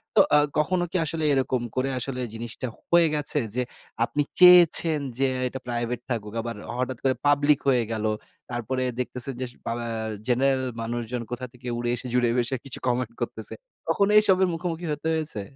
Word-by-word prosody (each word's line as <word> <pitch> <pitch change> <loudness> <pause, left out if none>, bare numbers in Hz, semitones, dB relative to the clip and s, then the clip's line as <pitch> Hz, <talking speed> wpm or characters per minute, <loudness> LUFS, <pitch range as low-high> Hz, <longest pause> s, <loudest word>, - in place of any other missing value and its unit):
তো 200 - +8
আ - - +8 0.2
কখনো 175 +4 +2
কি 185 - +1
আসলে 160 0 -1
এরকম 130 -2 +1
করে 130 +1 +1
আসলে 130 +1 -3
জিনিসটা 120 +3 -5 0.2
হয়ে 170 -1 +6
গেছে 150 0 0 0.2
যে 125 - +1 0.4
আপনি 145 +4 -1 0.2
চেয়েছেন 175 -3 +7 0.2
যে 135 - +3 0.2
এটা 130 +1 -6
প্রাইভেট 120 0 -2
থাকুক। 105 -3 -3
আবার 115 0 -5 0.2
হঠাৎ 130 -1 -2
করে 130 -1 +2
পাবলিক 145 0 +4
হয়ে 125 -3 +3
গেল। 110 -1 -2 0.5
তারপরে 130 +2 -2 0.2
দেখতেছেন 125 +1 -2
যে - - 0 0.2
পা - - -1
ব্যা 115 - -4 0.4
জেনারেল 130 +2 +2 0.2
মানুষজন 120 +1 -3
কোথা 125 +1 -3
থেকে 125 0 -11
উড়ে 120 0 -1
এসে 125 +2 -5
জুড়ে 120 -1 +3
বসে 120 +2 0
কিছু 135 - -6
কমেন্ট 120 -2 0
করতেছে? - - -3 0.3
কখনো 200 +1 +2
এইসবের 190 -3 +5
মুখোমুখি 170 0 -3
হতে 150 +2 -4
হয়েছে? 155 -10 -2
130 Hz, 175 wpm, -25 LUFS, 120-150 Hz, 0.5 s, তো